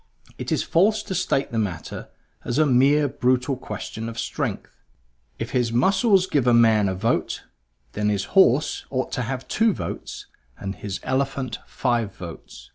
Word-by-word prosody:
It - - -4
is - - +1
false 210 +5 +2
to 190 - -5
state 140 -5 0
the 115 - -1
matter 95 -6 -4 0.3
as 120 - -2
a 155 - +5
mere 140 +3 +4
brutal 130 0 +1
question 110 -1 -6
of 115 - -9
strength. - - -4 0.6
If - - -5
his 125 -2 +1
muscles 190 - +3
give 145 -9 0
a 120 - +6
man 110 -3 +5
a 95 - -2
vote, 115 +5 -1 0.5
then 105 0 0
his 100 -2 0
horse 150 -7 +4
ought 130 -1 -2
to - - -2
have 130 +2 -4
two 225 -1 +2
votes - - -6 0.3
and 95 -1 -4
his 100 -1 -5
elephant 130 -2 -1
five 120 -6 -1
votes. 85 -2 -10
125 Hz, 165 wpm, -24 LUFS, 110-145 Hz, 0.6 s, a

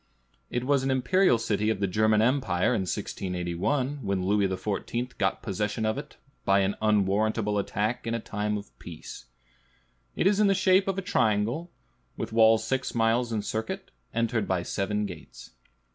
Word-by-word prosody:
It 120 - -2
was 140 +1 +2
an 135 - 0
imperial 130 +4 +3
city 105 -1 0
of 110 -3 0
the 100 - +1
German 110 +2 +3
empire 115 -8 +2
in - - +1
1681, 95 - -2
when 100 -4 -1
Louis 100 0 +2
XIV. 105 +6 -3
got 95 -1 0
possession 105 +2 -2
of 110 +5 0
it, 150 +1 -11 0.3
by 100 0 +3
an 95 +1 +1
unwarrantable 105 0 +1
attack 105 +4 -2
in 115 - 0
a - - -1
time 105 -1 -2
of 100 - -10
peace. - - -10 0.9
It - - 0
is 200 +1 +4
in 205 -2 +5
shape 190 +1 +3
a 195 0 0
triangle, 120 - +1 0.5
with - - -5
walls 110 0 +5
six 130 +3 -2
miles 115 +1 +2
in 110 -2 -1
circuit, 110 +1 -4 0.2
entered 115 -2 0
by 90 -2 0
seven 105 +3 -1
gates. 80 -10 -10
110 Hz, 160 wpm, -27 LUFS, 100-125 Hz, 0.9 s, in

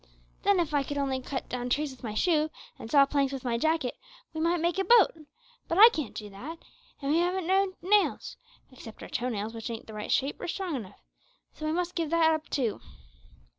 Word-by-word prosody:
Then, 400 -2 +3
if 320 -3 -1
I 290 - +3
could 285 +1 -4
only 270 -2 -1
cut 260 0 -5
down 245 0 -4
trees 290 +2 0
with 260 - -14
my 215 -3 -4
shoe, 310 +3 +2 0.3
and 225 - -8
saw 280 0 +6
planks 275 -1 0
with 270 -2 -5
my 235 -2 -1
jacket, 315 -3 0 0.3
we 315 - -3
might 340 +1 +2
make 345 +3 0
a - - +2
boat; 445 +1 +6 0.6
but 335 - -1
I 445 +4 +11
can't 305 - -5
do 210 - -6
that, 275 +12 -8 0.5
and 275 - 0
we 320 - +3
haven't 360 +1 0
no 380 +1 +2
nails 405 +2 +2 0.4
except 235 -4 -11
our - - -9
toe 250 +1 -2
nails, 215 -1 -3
which 225 0 -6
ain't 230 -1 -6
the 220 - -11
right 210 0 -5
shape 275 +2 0
or - - -4
strong 360 -2 -3
enough; 205 -6 -8 0.5
so 310 - -5
we - - 0
must 350 +2 -1
give 330 -3 -2
that 325 -1 +4
up 315 0 -4
too. 240 -7 -1
295 Hz, 225 wpm, -28 LUFS, 250-340 Hz, 0.6 s, I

